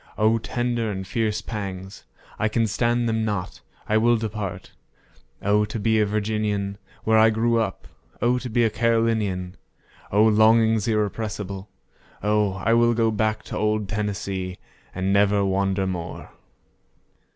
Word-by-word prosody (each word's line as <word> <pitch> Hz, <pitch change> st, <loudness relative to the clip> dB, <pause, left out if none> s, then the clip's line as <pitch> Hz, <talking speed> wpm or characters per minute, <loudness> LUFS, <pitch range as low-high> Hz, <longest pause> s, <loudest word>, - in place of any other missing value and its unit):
O 110 Hz, +2 st, +3 dB
tender 120 Hz, 0 st, -2 dB
and 95 Hz, -2 st, -4 dB
fierce 110 Hz, +1 st, -1 dB
pangs—I 95 Hz, +1 st, -6 dB
can 115 Hz, +1 st, +1 dB
stand 120 Hz, +3 st, +1 dB
them 110 Hz, -1 st, 0 dB
not—I 105 Hz, +1 st, -3 dB
will 120 Hz, +1 st, +4 dB
depart;O 100 Hz, -, -4 dB
to 110 Hz, -, -5 dB
be 110 Hz, +1 st, +2 dB
a 105 Hz, -, +3 dB
Virginian, 105 Hz, -1 st, -1 dB, 0.2 s
where 110 Hz, 0 st, +4 dB
I 110 Hz, +1 st, +6 dB
grew 115 Hz, +1 st, +1 dB
up! 105 Hz, -4 st, -3 dB, 0.3 s
O 125 Hz, +1 st, +2 dB
to 125 Hz, -, -6 dB
be 120 Hz, +1 st, +2 dB
a 110 Hz, -, +2 dB
Carolinian!O 110 Hz, -3 st, -1 dB
longings 110 Hz, 0 st, +4 dB
irrepressible! 105 Hz, -2 st, -2 dB, 0.5 s
O 105 Hz, -1 st, +2 dB
I 95 Hz, +4 st, 0 dB
will 120 Hz, 0 st, +4 dB
go 115 Hz, -1 st, +2 dB
back 110 Hz, 0 st, 0 dB
to -, -, -6 dB
old 105 Hz, -1 st, 0 dB
Tennessee, 95 Hz, -3 st, -3 dB, 0.4 s
and 95 Hz, +1 st, 0 dB
never 100 Hz, 0 st, +3 dB
wander 95 Hz, 0 st, 0 dB
more! 90 Hz, -3 st, -5 dB
105 Hz, 130 wpm, -24 LUFS, 100-115 Hz, 0.5 s, I